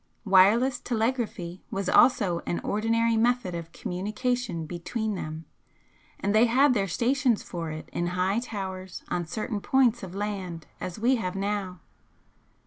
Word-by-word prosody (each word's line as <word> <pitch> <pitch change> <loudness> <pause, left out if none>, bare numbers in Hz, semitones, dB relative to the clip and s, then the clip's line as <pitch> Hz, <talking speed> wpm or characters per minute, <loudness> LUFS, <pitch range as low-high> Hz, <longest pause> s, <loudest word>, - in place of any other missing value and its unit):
Wireless 215 +7 +5
telegraphy 220 -7 -2
was 195 -1 -3
also 190 -9 +4
an 175 - -1
ordinary 230 +2 +1
method 235 -4 +1
of 165 -1 -6
communication 210 -1 -2
between 210 +7 -3
them, 160 -3 -5 0.7
and 200 - 0
they 220 +3 +5
had 260 +3 +4
their 200 -4 +1
'stations' 245 +5 +1
for 165 -2 -5
it 155 0 -7
in 175 - -1
high 185 +4 +1
towers 190 -6 -6
on 175 -2 -2
certain 215 +3 -3
points 245 -2 +3
of 190 -2 -8
land 195 -5 -4
as 180 - -5
we 245 +4 +3
have 185 -5 -3
now. 195 -3 -2
205 Hz, 140 wpm, -27 LUFS, 180-235 Hz, 0.7 s, Wireless